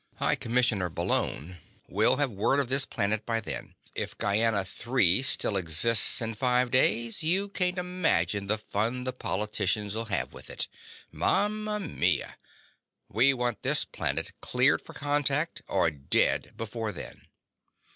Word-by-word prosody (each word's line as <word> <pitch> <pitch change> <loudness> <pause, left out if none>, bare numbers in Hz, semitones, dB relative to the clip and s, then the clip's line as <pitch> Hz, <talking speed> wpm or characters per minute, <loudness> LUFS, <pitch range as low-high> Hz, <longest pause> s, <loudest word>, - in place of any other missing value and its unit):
High - - +3
Commissioner 115 -6 0
Bullone 85 +1 -2 0.3
will 105 +4 +2
have 145 -3 0
word 105 +7 +1
of 135 -4 -2
this 135 +1 +3
planet 105 +2 -1
by 115 -1 -1
then. 110 - -7 0.2
If - - -5
Gienah 105 -1 +1 0.2
III 120 -6 +4
still 130 -5 +1
exists 95 +5 +4
in 115 0 -3
five 125 +2 0
days, 115 -2 +2
can't - - -5
you 185 +1 +1
imagine 135 - 0
the 110 +2 +1
fun 110 +4 -3
the 130 0 -3
politicians'll 105 0 -1
have 95 -8 -2
with - - -12
it? - - -1 0.4
Mama 210 +1 0
mia! 185 -8 -1 0.7
We 130 +5 +3
want 120 -3 -2
this - - +2
planet - - -3
cleared - - +2
for - - -14
contact 145 +2 0
or 80 - +1
dead 70 -2 0
before 115 0 -4
then." 90 - -11
115 Hz, 140 wpm, -27 LUFS, 100-135 Hz, 0.7 s, III